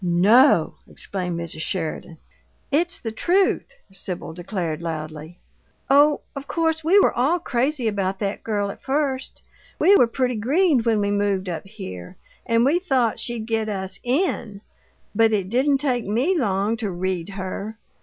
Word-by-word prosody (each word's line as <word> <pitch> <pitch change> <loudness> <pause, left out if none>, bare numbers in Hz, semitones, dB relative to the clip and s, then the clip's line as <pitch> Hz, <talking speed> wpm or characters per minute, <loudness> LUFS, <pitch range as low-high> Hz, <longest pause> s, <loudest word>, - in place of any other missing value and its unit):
"No!" 185 - +4
exclaimed 180 -3 -4
Mrs. 165 -2 -4
Sheridan. 165 -1 -3 0.5
"It's 335 +4 +1
the 225 - -4
truth," 370 - +1 0.2
Sibyl 180 -4 -4
declared, 175 -3 -4
loudly. 155 0 -6 0.5
"Oh, 290 +1 +5
of 275 0 -7
course 320 -1 0
we 345 +6 +4
were - - +4
all 275 +9 +2
crazy 265 -4 -1
about 195 -2 -1
that 200 0 -3
girl 205 -2 -1
at - - -13
first. 270 -1 -2 0.3
We 400 - +5
were 245 - +5
pretty 250 0 -1
green 290 - +3
when 225 -2 +1
we 200 0 0
moved 200 -2 0
up 170 +1 -5
here, 185 - -9 0.3
and 230 +1 +3
we 310 +6 +3
thought 260 - +1
she'd 235 -2 -3
get 220 -1 -1
us 190 -2 -4
IN 245 - -1 0.5
but 225 +1 +3
it 195 -3 0
didn't 270 +5 +2
take 255 -6 -1
ME 250 - +1
long 210 - 0
to 220 -3 -3
read 180 -1 -3
her! 195 +3 -5
220 Hz, 155 wpm, -23 LUFS, 190-270 Hz, 0.5 s, Oh